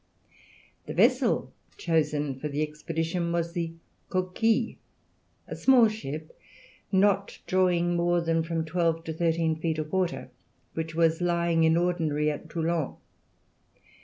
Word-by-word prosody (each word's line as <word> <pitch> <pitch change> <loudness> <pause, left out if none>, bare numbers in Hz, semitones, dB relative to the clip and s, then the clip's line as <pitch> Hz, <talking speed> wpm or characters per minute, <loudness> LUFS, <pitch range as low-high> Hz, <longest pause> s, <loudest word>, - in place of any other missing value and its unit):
The - - -5
vessel - - +2 0.2
chosen 150 -4 0
for 150 - -3
the 145 +1 -1
expedition 165 +3 -2
was 170 0 -1
the 170 -1 -3 0.4
Coquille, 220 +6 0 0.7
a - - -6
small 250 -4 +5
ship, 155 -7 -7 0.6
not 195 0 +2
drawing 175 -2 +2
more 175 0 +2
than 165 -1 +1
from 165 0 -2
twelve 165 0 0
to 160 - -4
thirteen 165 0 +1
feet 160 0 -1
of 155 0 -4
water, 180 -8 -1 0.4
which 160 0 -4
was 165 0 +2
lying 170 -2 +2
in 160 +1 +4
ordinary 160 -4 +1
at 150 - -8
Toulon. 165 -3 -1
165 Hz, 130 wpm, -27 LUFS, 160-175 Hz, 0.7 s, small